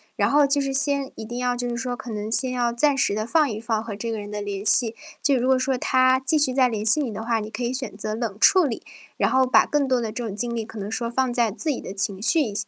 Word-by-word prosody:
然 - - +1
后 290 0 +4
就 280 +1 +1
是 275 -1 -2
先 280 0 0
一 220 - -7
定 240 +2 -7
要 245 0 0
就 245 0 -3
是 235 - -3
说， 250 0 -3
可 240 +1 -8
能 210 0 -4
先 255 +3 +1
要 240 -1 0
暂 285 +4 +2
时 205 - +1
地 215 0 -2
放 305 +3 +2
一 215 - -4
放 220 -1 -2
和 220 -2 -6
这 230 +3 -4
个 220 - -3
人 205 0 -8
的 210 0 -5
联 200 0 -5
系。 225 +1 +4 0.3
就 280 -2 +3
如 250 +1 0
果 260 0 +4
说 260 0 0
他 255 +1 +3
继 265 +4 +1
续 285 -4 +2
再 260 -1 +4
联 215 -3 -3
系 220 +8 +6
你 270 - -2
的 220 +2 -5
话， 230 0 0
你 210 0 -6
可 220 +3 -5
以 240 - -1
选 260 -6 -5
择 210 +1 -4
冷 225 -4 -4
处 365 - +5
理， 240 - -4 0.3
然 - - +1
后 260 0 +4
把 - - +5
更 290 -2 0
多 255 -2 +1
的 220 - -3
这 235 +1 -4
种 200 - -6
精 235 +3 -3
力 225 -2 -3
可 220 - -11
能 205 +1 -5
说 235 +1 -2
放 255 +1 0
在 240 -2 +1
自 305 +9 -4
己 275 - -1
的 - - -7
情 195 0 -2
绪 315 +8 +2
一 225 -8 -2
240 Hz, 330 characters per minute, -23 LUFS, 220-265 Hz, 0.3 s, 系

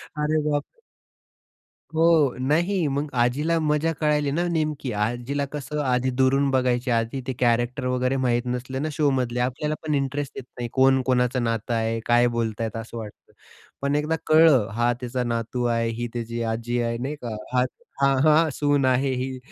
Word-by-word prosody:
अरे 150 +1 +1
बापरे! 145 - -3 1.1
हो. 160 -4 +4
नाही, 165 +5 +1
मग 140 +2 -1
आजीला 150 +7 +1
मजा 155 +1 +1
कळाली 150 -2 +1
ना, 170 +4 0
नेमकी 150 -5 -1
आजीला 120 +7 -1
कसं 150 0 -4
आधी 125 0 +1
दुरून 135 +1 +3
बघायची 125 -1 +1
आधी 115 +3 0
ते 130 - -1
कॅरेक्टर 120 +2 +1
वगैरे 125 +1 0
माहीत 120 -1 +1
नसले 125 +2 -3
ना 155 +2 -2
शो 145 0 +1
मधले 125 -2 -1
आपल्याला 130 +5 -1
पण 150 -2 0
इंटरेस्ट 140 +1 -2
येत - - -6
नाही, 120 -1 -4
कोण 130 0 +4
कोणाचं 125 -1 +1
नातं 115 0 -1
आहे, 115 0 0
काय 120 0 +4
बोलतायत 115 -1 -2
असं 115 +1 -7
वाटतं. 105 -2 -10 0.5
पण 140 +1 0
एकदा 150 +2 0
कळंल 155 -8 +6
हा 120 +1 +2
त्याचा 125 0 -3
नातू 120 +1 -2
आहे, 115 -1 +1
ही 120 +1 -3
त्याची 115 0 -4
आजी 120 +1 -2
आहे 115 0 -1
नाही 135 +5 -4
का 115 -3 -4 0.2
हां, 125 0 +3 0.4
हां, 135 -1 +4
हां. 155 +1 +5
सून 145 -2 +1
आहे 130 +1 +2
ही 130 +1 -3
130 Hz, 170 wpm, -24 LUFS, 120-145 Hz, 1.1 s, कळंल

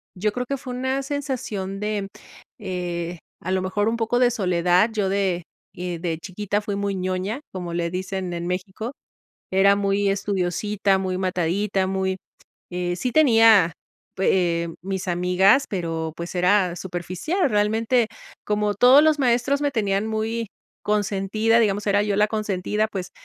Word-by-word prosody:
yo 210 +3 0
creo 250 +3 -3
que 275 +2 -2
fue 255 -1 -7
una 260 +2 -1
sensación 255 -9 -4
de, 210 -1 -2 0.5
eh, 175 -2 -4 0.2
a 185 - -5
lo 190 0 +1
mejor, 205 +3 0
un 230 - -1
poco 230 +1 0
de 250 -1 +5
soledad. 180 -1 +2
Yo 205 -3 0
de, 190 -3 0 0.3
eh, 175 -1 -4
de 165 -1 -3
chiquita 205 +3 -3
fui 205 -1 -3
muy 200 0 -1
ñoña, 185 +6 -2
como 175 -2 -5
le 170 0 -1
dicen 185 0 -4
en 170 0 -4
México. 190 +6 -4 0.6
Era 195 +1 +5
muy 200 0 +1
estudiosita, 195 +1 0
muy 185 -1 -2
matadita, 185 +2 0
muy 190 0 -1 0.5
eh, 175 0 -2
sí 250 +7 -2
tenía 225 - +6 0.4
pu 190 - -3
eh, 170 -3 +2
mis 190 0 -4
amigas, 180 +8 +3
pero, 165 -4 -3
pues, 170 +2 -6
era 180 0 +3
superficial, 185 - -2
realmente. 220 +3 +2 0.4
Como 210 0 0
todos 250 +7 +7
los 310 -1 +3
maestros, 250 +2 +2
me 290 - +1
tenían 205 -3 0
muy 220 +1 -2 0.3
consentida, 210 +2 +1
digamos, 210 -2 +1
era 205 0 +3
yo 210 -1 0
la 210 +1 +3
consentida, 210 -1 -1
pues, 190 -4 -5
195 Hz, 155 wpm, -23 LUFS, 180-220 Hz, 0.6 s, todos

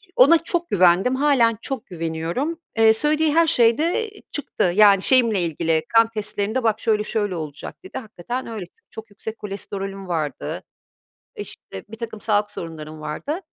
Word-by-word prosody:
ona 285 +7 +7
çok 340 +1 -2
güvendim, 185 +6 +4
hâlen 260 -5 +3
çok 265 -4 -4
güveniyorum. 170 - -3 0.2
Eee, 225 0 +6
söylediği 300 +5 +1
her 335 0 +5
şey 235 -5 +4
de, 345 +8 0
eee, 415 - -17
çıktı 250 -10 -1
yani 200 -2 +6
şeyimle 230 -5 +3
ilgili, 165 -1 0
kan 225 0 +7
testlerinde 210 +2 -1
"bak 220 -1 +1
şöyle 215 -3 +1
şöyle 205 -3 -1
olacak" 155 - -7
dedi. 375 - -8
Hakikaten 240 +2 -6
öyle 220 -5 -6
ç - - -24 0.2
çok 220 0 -10
yüksek 215 +2 -8
kolesterolüm 195 -1 -6
vardı, 160 -4 -3 0.7
işte, 415 - -8
birtakım 225 0 -7
sağlık 205 -1 +1
sorunlarım 155 -2 -8
vardı. 155 - -4
220 Hz, 155 wpm, -22 LUFS, 180-260 Hz, 0.7 s, ona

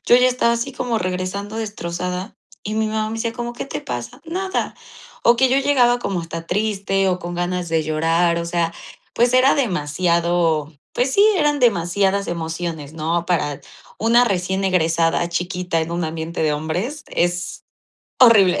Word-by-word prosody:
yo - - +6
ya 250 0 +5
estaba 245 -2 +2
así 235 +4 -3
como 245 -3 -1
regresando 185 +4 -3
destrozada, 180 -2 -4 0.3
y 215 +1 -4
mi 220 0 +1
mamá 215 0 -1
me - - -4
decía: 230 0 -2
"¿Cómo 240 0 -5
qué - - -5
te 150 - -5
pasa?"." 125 - -6
Nada", 380 +3 -2 0.5
o 235 0 +6
que 260 +1 +4
yo 260 - +2
llegaba 245 -4 +3
como 195 -6 -2
hasta 165 0 -7
triste, 195 -1 0
o 180 0 0
con 175 0 -6
ganas 175 0 -2
de 160 -1 +2
llorar, 165 +2 +1
o 170 - -3
sea, 170 -1 0 0.4
pues, 240 +1 +3
era 255 +2 +5
demasiado, 170 - 0 0.2
pues 260 +2 0
sí, 405 - +6
eran 295 -2 +2
demasiadas 200 -2 +2
emociones, 160 -3 -4
¿no? 165 +2 -1
Para 150 -5 -1 0.4
una 235 +2 +4
recién 190 -2 -1
egresada 165 -2 +2
chiquita 180 -1 -1
en 160 +1 -3
un 170 -1 -1
ambiente 160 +1 -4
de 155 -1 +2
hombres, 180 - -3
es 175 -1 -2 0.6
horrible. 205 -7 +6
180 Hz, 170 wpm, -20 LUFS, 170-230 Hz, 0.6 s, yo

